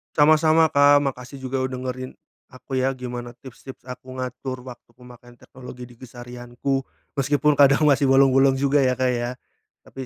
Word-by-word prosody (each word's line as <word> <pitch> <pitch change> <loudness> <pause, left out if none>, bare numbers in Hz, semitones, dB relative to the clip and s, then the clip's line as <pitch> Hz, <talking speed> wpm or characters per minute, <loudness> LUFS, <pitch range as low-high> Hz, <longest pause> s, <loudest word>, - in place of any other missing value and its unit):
Sama-sama, 155 +1 +4
Kak. 145 0 +5
Makasih 135 -1 -6
juga 130 0 -3
udah 130 - -6
dengerin 130 0 -5 0.4
aku 130 +1 -6
ya 130 +1 0
gimana 120 -1 -7
tips-tips 130 +1 -13
aku 130 0 -10
ngatur 130 0 -6
waktu 125 -2 -13
pemakaian 120 0 -16
teknologi 125 0 -12
di 120 - -18
keseharianku, 125 +2 -5 0.3
meskipun 145 +1 +1
kadang 140 +1 +5
masih 140 0 +3
bolong-bolong 135 0 +4
juga 140 +2 +1
ya, 130 -3 +2
Kak, 130 0 0
ya, 120 0 -2 0.5
tapi 130 - -10
130 Hz, 155 wpm, -22 LUFS, 125-135 Hz, 0.5 s, Kak